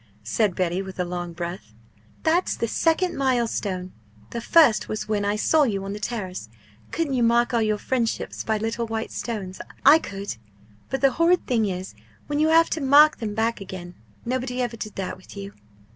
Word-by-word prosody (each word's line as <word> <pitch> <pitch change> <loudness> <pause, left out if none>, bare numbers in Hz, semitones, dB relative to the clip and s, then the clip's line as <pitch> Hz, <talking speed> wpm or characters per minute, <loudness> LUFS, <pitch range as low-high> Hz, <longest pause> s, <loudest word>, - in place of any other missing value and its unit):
said 190 - +1
Betty, 180 0 0
with 190 -1 -9
a 180 - +1
long 175 0 -4
breath. 170 - -7 0.5
"That's 335 +3 +2
the 230 - -1
second 335 +8 +1
milestone; 225 -8 -1 0.4
the 235 - -4
first 240 -6 +4
was 215 - -3
when 210 -1 0
I 205 +1 +1
saw 310 +8 +3
you 205 -8 +1
on 195 - -4
the 210 - -6
Terrace. 190 - -4 0.4
Couldn't 320 -4 -1
you 250 - +1
mark 235 +1 +3
all 235 - +3
your 215 -1 +1
friendships 235 +1 -2
by 220 -1 0
little 225 +2 -2
white 225 0 -3
stones? 200 -6 -5 0.2
I 295 +4 +9
could. 200 - -6 0.5
But 270 - -2
the 275 -1 +5
horrid 335 +6 +3
thing 225 -4 +1
is 185 0 -5 0.3
when 295 0 -2
you 310 - +4
have 330 +1 +5
to 315 - -1
mark 290 +3 +6
them 210 -3 -4
back 225 0 0
again! 185 -2 -8 0.3
Nobody 250 +1 -2
ever 245 -2 -1
did 215 -2 -7
that 190 -1 -4
with 185 +2 -14
you!" 200 0 -7
225 Hz, 190 wpm, -24 LUFS, 195-260 Hz, 0.5 s, I